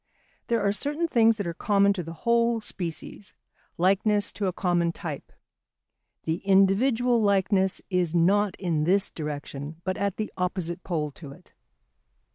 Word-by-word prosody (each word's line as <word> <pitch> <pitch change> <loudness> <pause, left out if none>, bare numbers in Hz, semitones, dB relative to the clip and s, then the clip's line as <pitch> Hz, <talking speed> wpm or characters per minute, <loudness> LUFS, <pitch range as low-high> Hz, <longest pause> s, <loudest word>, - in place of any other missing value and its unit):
There 230 -3 +1
are 200 - +3
certain 295 +10 -1
things 230 -6 +4
that 205 - -3
are 170 - -3
common 200 +2 +2
to 190 - -4
the 165 0 -7
whole 235 0 +3
species, 190 -1 -5 0.4
likeness 205 +3 +2
to 200 - -2
a - - +1
common 175 -2 0
type; 155 -4 -7 0.9
the 160 +1 -1
individual 225 +6 +3
likeness 195 -2 +1
is 175 -2 0
not 195 +4 +3
in 165 -5 -1
this 195 +3 +2
direction 150 0 -6
but 185 0 -2
at 200 -1 -1
the 215 - -4
opposite 180 -1 -2
pole 155 -4 -2
to 140 -1 -11
it. - - -20
190 Hz, 150 wpm, -26 LUFS, 170-210 Hz, 0.9 s, things